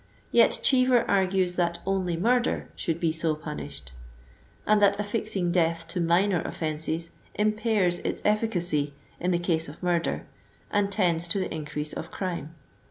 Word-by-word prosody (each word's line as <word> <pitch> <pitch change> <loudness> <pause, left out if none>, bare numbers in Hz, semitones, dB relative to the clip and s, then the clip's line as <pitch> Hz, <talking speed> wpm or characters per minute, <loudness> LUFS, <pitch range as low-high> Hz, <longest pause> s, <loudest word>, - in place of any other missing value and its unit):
Yet - - +5
Cheever 255 -2 +4
argues 190 -2 +1
that 170 -1 +1
only 185 -3 0
murder 240 +6 +1
should 165 -3 -2
be 165 -2 +1
so 160 -1 0
punished, 70 - -7 0.7
and 210 0 +4
that 200 0 +4
affixing 205 -4 -1
death 165 -1 +1
to 175 +1 -2
minor 175 +2 +3
offenses 160 +1 -3 0.2
impairs 210 -4 +1
its - - -3
efficacy 175 -9 +1 0.2
in 180 - -1
the 175 - +2
case 165 -3 -1
of 155 +5 -12
murder, 175 -2 0 0.5
and 205 -1 +1
tends 175 -4 +2
to 170 - +1
the 185 - -3
increase 150 -1 -4
of 165 - -6
crime. 170 -4 -4
175 Hz, 150 wpm, -27 LUFS, 165-200 Hz, 0.7 s, Yet